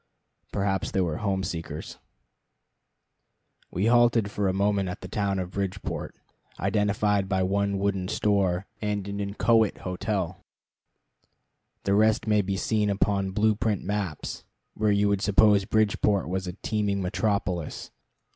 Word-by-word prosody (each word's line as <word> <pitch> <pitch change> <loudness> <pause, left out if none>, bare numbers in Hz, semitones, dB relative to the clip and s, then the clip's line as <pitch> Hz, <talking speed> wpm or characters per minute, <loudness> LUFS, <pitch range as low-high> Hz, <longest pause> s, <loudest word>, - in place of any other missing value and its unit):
Perhaps 95 -1 -1
they 95 - 0
were 80 -4 -1
home 95 -3 -1
seekers. 85 -3 -5 1.7
We 95 +4 -1
halted 120 -3 +3
a 100 -2 +1
moment 100 0 +1
at 90 - -6
the - - -7
town 100 -2 -1
of 90 -1 -3
Bridgeport, 95 -1 -4 0.4
identified 105 -1 +1
by 95 -2 +1
one 100 +1 0
wooden 95 -2 -1
store 95 -2 +1 0.2
and 105 -2 -2
an 100 0 -4
inchoate 110 +2 +2
hotel. 95 -1 -2 1.4
The 100 - +1
rest 110 +2 +3
may 105 -1 +3
be 95 0 -2
seen 105 +1 +1
upon 100 -1 +1
blue 105 +3 +2
print 105 -2 -1
maps, 100 -6 -3 0.3
where 110 0 +1
you 100 0 +3
would 100 -1 +1
suppose 105 -1 +4
Bridgeport 105 -3 +2
was 95 +1 -2
a 90 - -4
teeming 105 0 -1
metropolis. 95 -3 -2
100 Hz, 135 wpm, -26 LUFS, 95-105 Hz, 1.7 s, suppose